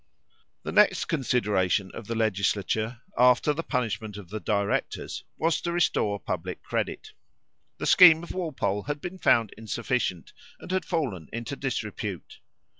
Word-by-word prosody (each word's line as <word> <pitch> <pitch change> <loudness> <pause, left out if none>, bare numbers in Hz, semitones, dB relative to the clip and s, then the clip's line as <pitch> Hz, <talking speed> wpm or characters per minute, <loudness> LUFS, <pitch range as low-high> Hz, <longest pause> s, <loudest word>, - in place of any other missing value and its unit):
The - - -4
next - - +4
consideration 105 - +1
of 115 - -8
the 115 - -3
legislature, 110 +2 0 0.2
after 125 +4 +5
the 155 - -3
punishment 110 -8 -3
of 100 -4 -10
the 110 +2 -4
directors, 100 -1 -2
was 165 0 +1
to 170 - -2
restore 110 -12 +1
public - - -5
credit. - - -3 0.7
The - - -4
scheme 170 -3 +8
of 175 - -7
Walpole 155 - -2
had 145 0 -3
been 180 +4 -7
found 115 - +3
insufficient, 115 -5 -2 0.3
and - - -9
had 185 0 0
fallen 130 - -2
into 115 +4 -4
disrepute. 110 - -4
115 Hz, 140 wpm, -27 LUFS, 105-150 Hz, 0.7 s, scheme